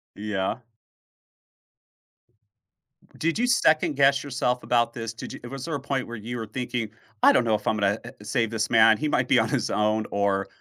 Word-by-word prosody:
Yeah. 100 +1 -2 2.6
Did 165 +6 -1
you 245 - +2
second 160 - +3
guess 140 0 +3
yourself 125 -3 -1
about 120 -1 +1
this? 115 -1 -5
Did 115 - -8
you - - -9
was 135 0 -6
there 165 - -4
a 140 - -3
point 135 -1 -2
where 120 - -7
you 120 +3 -6
were 115 - -4
thinking, 120 0 -4 0.3
"I - - +8
don't 125 - +3
know 110 -2 +2
if 105 - -5
I'm 110 - +1
gonna 100 +1 +1 0.2
a 105 - -13
save 115 0 0
this 110 -2 -1
man, 110 -1 +6
he 155 - -2
might 125 -3 +1
be 125 - +4
on 110 - +1
his 120 -3 -1
own" 105 0 +1
or, 100 -1 0
115 Hz, 200 wpm, -25 LUFS, 110-135 Hz, 2.6 s, I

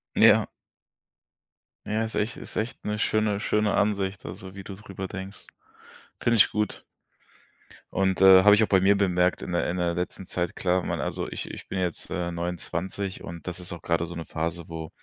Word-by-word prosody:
Ja. - - +6 1.4
Ja, 110 +1 0
ist 110 - -6
echt 105 +3 0
ist - - -9
echt 115 +4 -3
'ne 105 0 -1
schöne 105 -1 +1
schöne 105 -1 +1
Ansicht, 100 -2 0
also, 95 +2 -8
wie 100 - -8
du 100 - -7
drüber 95 -2 -7
denkst. 95 +1 -8 0.7
Finde 120 0 +3
ich 105 - +6
gut. 105 -1 -2 1.1
Und, 95 -1 +1
äh, 95 -1 +9
habe 105 +1 +8
ich 105 - +4
auch - - +2
bei 95 - +4
mir 100 +1 +5
bemerkt 90 -2 +2
in - - -5
der 85 - 0
in 90 - -2
der 85 -1 +1
letzten 90 +2 -4
Zeit, 90 -1 -2
klar, 90 0 +1
man - - -2
also - - -3
ich - - -5
ich - - -9
bin - - -4
jetzt, 90 -3 -2
äh, 85 0 -2
29 90 +3 -4
und 85 0 -8
das 90 0 -5
ist 90 - -8
auch 85 -2 -7
grade 85 0 0
so 85 - -8
'ne 85 -1 -5
Phase, 85 +1 -3
wo 80 -1 -6
95 Hz, 200 wpm, -26 LUFS, 85-100 Hz, 1.4 s, äh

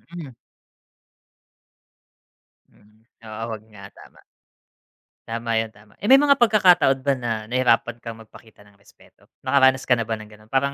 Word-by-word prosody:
Mm. 150 -7 -9 2.3
Mm. 105 +1 -27 0.2
Oo. 110 0 -9
'Wag 110 -2 -7
nga, 100 -1 -12
tama. - - -17 1.1
Tama 115 0 -4
'yan, 110 -1 -4
tama. 105 0 -21
Eh, 205 - -5
may 270 +1 +7
mga 285 -1 +3
pagkakataon 180 - +4
ba 140 0 +2
na 120 -2 -4 0.2
nahirapan 120 -1 +1
kang 115 -1 -9
magpakita 110 -1 -18
ng 100 -1 -25
respeto? 100 - -24 0.2
Nakaranas 130 -1 +3
ka 125 - +4
na 115 - -2
ba 115 - -2
ng 105 -1 -12
gano'n, 105 0 -19
parang 140 +1 0
115 Hz, 150 wpm, -22 LUFS, 110-140 Hz, 2.3 s, may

